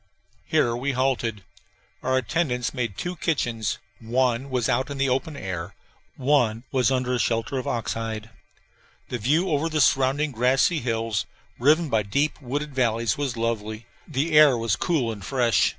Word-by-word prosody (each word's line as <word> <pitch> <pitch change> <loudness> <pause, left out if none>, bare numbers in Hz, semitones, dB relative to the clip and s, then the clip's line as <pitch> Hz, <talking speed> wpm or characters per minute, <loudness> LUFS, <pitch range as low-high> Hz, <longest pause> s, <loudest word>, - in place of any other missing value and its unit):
Here 120 -1 +2
we 135 +3 -1
halted. 125 -5 0 0.6
Our 130 0 +1
attendants 130 -1 -1
made 115 -7 -3
two 180 +1 -3
kitchens: 120 - -1 0.2
one 125 +2 0
was 125 -3 0
out 130 +2 +1
in 140 - -5
the 135 0 +1
open 135 +4 -1
air, 95 -4 -5 0.4
one 125 -5 +2
was 130 -2 +3
under 130 -1 0
a 125 - 0
shelter 115 +3 0
of 130 - -5
ox 115 -2 -1
hide. 110 -1 -5 0.8
The 125 - -3
view 155 - +2
over 150 +2 +1
the 155 -1 -1
surrounding 135 +2 +3
grassy 130 +7 +2
hills, 115 -4 -1 0.3
riven 155 +6 +4
by 110 -6 +2
deep 140 +10 -1
wooded 145 +3 -3
valleys, 115 -2 +1
was 140 -5 -3
lovely. 115 -1 -2 0.2
The 155 +2 -1
air 150 -4 +7
was 115 -4 0
cool 145 -10 0
and 100 -3 -8
fresh. 120 +1 +2
125 Hz, 165 wpm, -25 LUFS, 115-140 Hz, 0.8 s, air